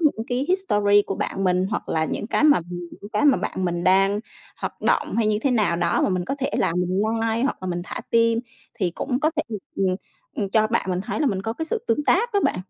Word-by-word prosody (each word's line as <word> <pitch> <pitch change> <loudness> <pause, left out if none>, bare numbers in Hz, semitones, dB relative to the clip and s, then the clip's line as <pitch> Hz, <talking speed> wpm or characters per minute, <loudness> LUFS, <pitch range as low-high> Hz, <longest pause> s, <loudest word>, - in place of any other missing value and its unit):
những 280 -8 +1
cái 250 +2 -1
history 205 - +3
của 195 - -2
bạn 195 - -3
mình 185 0 +2
hoặc 215 - -3
là 160 -1 +1
những 205 - -3
cái 280 - +1
mà 295 -10 +6
mình 175 -1 -6
những 205 - -10
cái 210 - +1
mà 280 -3 +6
bạn 190 - -3
mình 175 0 -1
đang 195 +2 +4 0.4
hoạt - - -6
động - - +1
hay 230 -2 +2
như 210 -1 +2
thế 275 - +2
nào 215 -8 +2
đó 170 0 +1
mà - - +2
mình 185 -2 -1
có 275 - -2
thể 275 - -1
là - - +1
mình 180 +2 0 0.3
like 230 +2 0
hoặc 280 - 0
là - - -4
mình 175 -1 -2
thả - - -6
tim 230 0 +3 0.4
thì 185 -6 -1
cũng 250 +8 -2
có 310 - +3
thể, 310 - +2 0.3
ừm, 195 - +1
ừm, 185 0 +1 0.4
ừm, 205 -3 -1
cho 215 +2 +3
bạn 220 -4 -1
mình 180 0 -1
thấy 195 - -4
là 300 - +2
mình 195 -6 0
có 225 - -2
cái 320 +7 -4
sự 445 +8 -2
tương 295 - +1
tác 460 +11 +2
á 405 - +3
bạn. - - +1
210 Hz, 270 wpm, -23 LUFS, 185-260 Hz, 0.4 s, mà